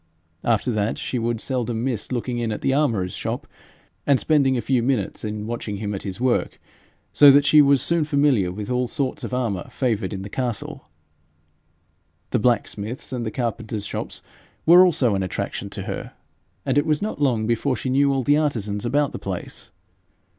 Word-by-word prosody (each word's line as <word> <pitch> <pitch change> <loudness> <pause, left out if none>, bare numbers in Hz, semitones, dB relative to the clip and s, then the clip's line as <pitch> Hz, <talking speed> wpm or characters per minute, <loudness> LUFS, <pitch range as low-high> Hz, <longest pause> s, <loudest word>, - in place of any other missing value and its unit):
After 115 +1 +1
that 105 -1 -1
she 125 - -3
would 115 0 -1
seldom 120 -2 -2
miss 125 -4 -3
looking 120 0 -2
in 115 -2 -1
at 105 - -4
the 135 - +1
armourer's 115 -11 +1
shop, - - -4 0.6
and 140 -3 +4
spending 140 -4 +3
a - - 0
few 130 -1 +1
minutes 120 -5 -1
in 105 -1 -4
watching 115 -3 -4
him 105 0 -3
at 95 - -4
his 95 0 -6
work, 125 0 0 0.5
so 145 - +8
that 140 +1 +6
she 150 0 +7
was 140 -2 +4
soon 170 -1 +2
familiar 140 - +2
with 105 +5 -6
all 125 0 +1
sorts 130 +2 -3
of - - -5
armour 115 -8 -2
favoured 115 -5 -1
in 95 -2 -5
the - - -6
castle. 120 0 -4 1.4
The - - +2
blacksmiths' 115 +2 -1
and 120 -3 -3
the - - 0
carpenters' 110 -2 -3
shops - - -5 0.4
were 175 +3 +8
also 140 - +3
an 95 - 0
attraction 95 -2 -4
to - - -6
her, - - -6 0.5
and - - +3
it 145 - -1
was 155 +3 +1
not 210 -8 -4
long 120 -6 +2
before 120 +4 0
she 130 +3 -3
knew 140 +1 +3
all 135 -1 0
the 145 +4 +4
artisans 115 -8 -1
about 145 +3 +1
the - - -6
place. 95 -3 -5
120 Hz, 190 wpm, -23 LUFS, 110-140 Hz, 1.4 s, so